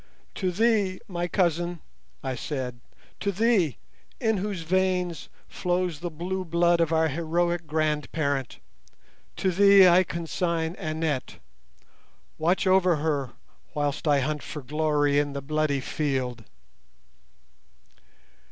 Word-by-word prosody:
'To 185 Hz, -, -1 dB
thee, 205 Hz, -1 st, +1 dB
my 175 Hz, -2 st, -2 dB
cousin,' 175 Hz, -1 st, 0 dB, 0.4 s
I 135 Hz, -1 st, -2 dB
said, 125 Hz, -2 st, -4 dB, 0.4 s
'to 200 Hz, -, 0 dB
thee, 200 Hz, -, +2 dB, 0.4 s
in 220 Hz, -4 st, +1 dB
whose 195 Hz, -2 st, -3 dB
veins 180 Hz, -1 st, 0 dB, 0.2 s
flows 180 Hz, -3 st, -1 dB
the 175 Hz, +1 st, -4 dB
blue 180 Hz, +4 st, -4 dB
blood 170 Hz, 0 st, +2 dB
of 165 Hz, -1 st, +1 dB
our 160 Hz, 0 st, +3 dB
heroic 170 Hz, +2 st, -1 dB
grandparent, 150 Hz, -3 st, -1 dB, 0.8 s
to 190 Hz, -, 0 dB
thee 200 Hz, +1 st, +7 dB
I 180 Hz, +1 st, +6 dB
consign 170 Hz, -1 st, -2 dB
Annette. 155 Hz, -4 st, -2 dB, 1.0 s
Watch 175 Hz, +5 st, +1 dB
over 185 Hz, -2 st, +4 dB
her 145 Hz, -5 st, -1 dB, 0.4 s
whilst 145 Hz, +1 st, -1 dB
I 145 Hz, -2 st, +4 dB
hunt 150 Hz, +2 st, -2 dB
for 150 Hz, -, -7 dB
glory 145 Hz, 0 st, +1 dB
in 145 Hz, -1 st, -1 dB
the 140 Hz, -, -3 dB
bloody 150 Hz, -1 st, 0 dB
field. 130 Hz, -5 st, -2 dB
165 Hz, 115 wpm, -26 LUFS, 150-180 Hz, 1.0 s, thee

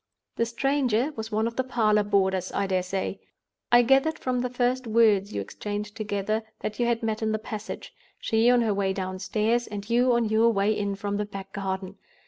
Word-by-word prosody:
The 230 Hz, -, 0 dB
stranger 260 Hz, +1 st, +1 dB
was 220 Hz, 0 st, -6 dB
one 215 Hz, +1 st, +1 dB
of 230 Hz, 0 st, -4 dB
the 260 Hz, -, +2 dB
parlor 220 Hz, -5 st, +2 dB
boarders, 190 Hz, -2 st, +1 dB
I 200 Hz, -, 0 dB
dare 185 Hz, -1 st, +1 dB
say. 190 Hz, +1 st, -3 dB, 0.5 s
I 240 Hz, 0 st, +7 dB
gathered 270 Hz, +6 st, +3 dB
from 250 Hz, -1 st, -1 dB
the 250 Hz, 0 st, -1 dB
first 250 Hz, 0 st, 0 dB
words 215 Hz, -3 st, +3 dB
you 100 Hz, -, -2 dB
exchanged 210 Hz, -, -5 dB
together, 215 Hz, 0 st, -1 dB, 0.2 s
that 215 Hz, -, -4 dB
you 240 Hz, -, +2 dB
had 235 Hz, -1 st, 0 dB
met 220 Hz, 0 st, -1 dB
in 220 Hz, 0 st, 0 dB
the -, -, +1 dB
passage—she 220 Hz, +1 st, -2 dB
on 245 Hz, -1 st, +5 dB
her 220 Hz, -3 st, +1 dB
way 195 Hz, -1 st, 0 dB
downstairs, 205 Hz, +5 st, -1 dB
and 205 Hz, -1 st, -6 dB
you 245 Hz, +2 st, +3 dB
on 235 Hz, -1 st, +2 dB
your 220 Hz, +2 st, +4 dB
way 210 Hz, 0 st, +2 dB
in 200 Hz, -1 st, -2 dB
from 200 Hz, 0 st, -3 dB
the 210 Hz, -, -1 dB
back 195 Hz, -1 st, -9 dB
garden. 190 Hz, -1 st, -4 dB
215 Hz, 200 wpm, -26 LUFS, 200-235 Hz, 0.5 s, I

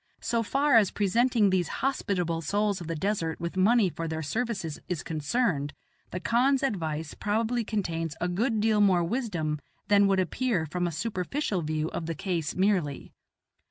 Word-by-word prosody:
So 230 Hz, 0 st, 0 dB
far 275 Hz, +3 st, +3 dB
as 205 Hz, -4 st, +5 dB
presenting 215 Hz, +1 st, +2 dB
these 185 Hz, -2 st, +1 dB, 0.2 s
hospitable 180 Hz, -11 st, 0 dB
souls 200 Hz, +4 st, 0 dB
of 170 Hz, -, -7 dB
the 165 Hz, -, -2 dB
desert 165 Hz, -2 st, -1 dB
with 170 Hz, +2 st, -4 dB
money 210 Hz, +3 st, +4 dB
for 165 Hz, -1 st, -4 dB
their 160 Hz, 0 st, -3 dB
services 205 Hz, -3 st, -2 dB
is 180 Hz, -3 st, -2 dB
concerned, 155 Hz, -, -1 dB, 0.3 s
the 180 Hz, -, -4 dB
khan's 255 Hz, +7 st, +2 dB
advice 160 Hz, -, -2 dB
probably 225 Hz, +3 st, 0 dB
contains 165 Hz, -8 st, -2 dB
a 175 Hz, -, 0 dB
good 220 Hz, +6 st, 0 dB
deal 215 Hz, 0 st, +3 dB
more 185 Hz, -4 st, +4 dB
wisdom 170 Hz, -, -2 dB, 0.3 s
than 200 Hz, -1 st, +5 dB
would 195 Hz, -1 st, +3 dB
appear 185 Hz, -1 st, 0 dB
from 175 Hz, +3 st, -2 dB
a -, -, -2 dB
superficial 195 Hz, -, -2 dB
view 155 Hz, 0 st, -1 dB
of 165 Hz, -, -4 dB
the 165 Hz, -, -2 dB
case 170 Hz, -2 st, -2 dB
merely. 185 Hz, -7 st, 0 dB
190 Hz, 165 wpm, -28 LUFS, 165-225 Hz, 0.3 s, as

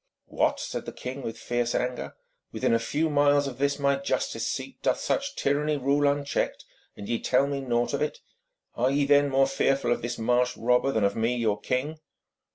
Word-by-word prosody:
'What!' -, -, 0 dB
said -, -, -5 dB
the -, -, -4 dB
king 130 Hz, +2 st, -6 dB
with 115 Hz, -3 st, -5 dB
fierce 120 Hz, -1 st, -1 dB
anger, 125 Hz, 0 st, -2 dB, 0.4 s
'within -, -, 0 dB
a 115 Hz, -, +3 dB
few 150 Hz, +7 st, 0 dB
miles 145 Hz, -1 st, +3 dB
of 130 Hz, -2 st, -6 dB
this 140 Hz, 0 st, +1 dB
my 140 Hz, -1 st, +2 dB
justice 140 Hz, -, -2 dB
seat -, -, -5 dB
doth -, -, +1 dB
such -, -, -1 dB
tyranny 150 Hz, +2 st, 0 dB
rule 140 Hz, +2 st, +2 dB
unchecked, 140 Hz, 0 st, -1 dB, 0.3 s
and 100 Hz, -, -8 dB
ye 115 Hz, -, -1 dB
tell 130 Hz, +2 st, +2 dB
me 140 Hz, -1 st, -3 dB
naught 120 Hz, -2 st, 0 dB
of -, -, -1 dB
it? -, -, -1 dB, 0.6 s
Are 125 Hz, +2 st, +1 dB
ye 140 Hz, +1 st, +2 dB
then 145 Hz, 0 st, +4 dB
more 135 Hz, 0 st, +4 dB
fearful 135 Hz, -2 st, +1 dB
of -, -, +1 dB
this 120 Hz, +1 st, -4 dB
marsh 125 Hz, +2 st, +1 dB
robber 125 Hz, +3 st, +2 dB
than 110 Hz, -5 st, 0 dB
of 100 Hz, 0 st, +1 dB
me 115 Hz, +2 st, 0 dB
your 110 Hz, -4 st, 0 dB
king?' 145 Hz, +5 st, -2 dB
135 Hz, 200 wpm, -27 LUFS, 120-140 Hz, 0.6 s, then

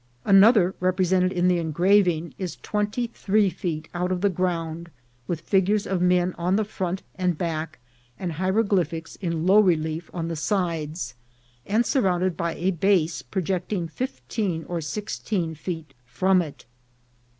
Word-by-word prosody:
Another, 195 Hz, -1 st, +6 dB
represented 185 Hz, 0 st, +2 dB
in 180 Hz, -1 st, +1 dB
the 180 Hz, -1 st, +3 dB
engraving, 170 Hz, +1 st, +2 dB
is 185 Hz, -3 st, -4 dB
twenty 210 Hz, +3 st, -1 dB
three 205 Hz, -1 st, +2 dB
feet 160 Hz, -2 st, -4 dB
out 180 Hz, +1 st, -1 dB
of 180 Hz, -1 st, -1 dB
the 200 Hz, -1 st, +3 dB
ground, 170 Hz, -2 st, -2 dB, 0.4 s
with 170 Hz, -2 st, -2 dB
figures 200 Hz, +3 st, +2 dB
of 190 Hz, -2 st, -1 dB
men 180 Hz, 0 st, +3 dB
on 180 Hz, +3 st, +1 dB
the 215 Hz, -, +2 dB
front 190 Hz, -2 st, -3 dB, 0.2 s
and 180 Hz, -3 st, +1 dB
back, 160 Hz, -2 st, -3 dB, 0.4 s
and 180 Hz, -2 st, -3 dB
hieroglyphics 185 Hz, -2 st, 0 dB
in 170 Hz, -3 st, -2 dB
low 195 Hz, +3 st, +6 dB
relief 160 Hz, -4 st, +1 dB
on 165 Hz, -2 st, -3 dB
the 165 Hz, -, -3 dB
sides, 160 Hz, -, -2 dB, 0.5 s
and 225 Hz, +4 st, +2 dB
surrounded 185 Hz, -7 st, +1 dB
by 170 Hz, +1 st, -2 dB
a 185 Hz, +3 st, 0 dB
base 175 Hz, -2 st, +1 dB
projecting 185 Hz, -1 st, -2 dB
fifteen 200 Hz, -, -3 dB
or 175 Hz, -1 st, -3 dB
six 205 Hz, +7 st, -4 dB
teen 175 Hz, -7 st, -2 dB
feet 160 Hz, -2 st, -6 dB
from 185 Hz, +8 st, +3 dB
it. 155 Hz, -4 st, -8 dB
180 Hz, 150 wpm, -25 LUFS, 165-195 Hz, 0.5 s, Another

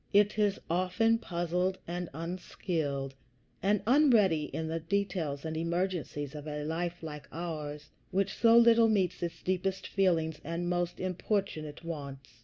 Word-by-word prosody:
It 205 Hz, +1 st, +4 dB
is 205 Hz, -2 st, +2 dB
often 185 Hz, +6 st, +2 dB
puzzled, 180 Hz, 0 st, -1 dB
and 175 Hz, 0 st, -3 dB
unskilled, 160 Hz, -4 st, -3 dB, 0.5 s
and 200 Hz, 0 st, +2 dB
unready 225 Hz, -, +5 dB
in 160 Hz, +2 st, -4 dB
the 165 Hz, +1 st, -2 dB
details 170 Hz, -5 st, -1 dB
and 160 Hz, 0 st, -3 dB
emergencies 170 Hz, -4 st, -2 dB
of 150 Hz, 0 st, -7 dB
a 150 Hz, 0 st, -3 dB
life 170 Hz, +2 st, -3 dB
like 150 Hz, -2 st, -7 dB
ours, 150 Hz, -3 st, -5 dB, 0.2 s
which 195 Hz, 0 st, 0 dB
so 230 Hz, 0 st, +5 dB
little 230 Hz, -1 st, +7 dB
meets 195 Hz, -5 st, +1 dB
its 170 Hz, -1 st, -4 dB
deepest 185 Hz, +1 st, -1 dB
feelings 165 Hz, -5 st, +1 dB
and 170 Hz, +2 st, -3 dB
most 175 Hz, 0 st, -1 dB
importunate 185 Hz, -5 st, -2 dB
wants. 140 Hz, -7 st, -7 dB
175 Hz, 140 wpm, -31 LUFS, 160-195 Hz, 0.5 s, little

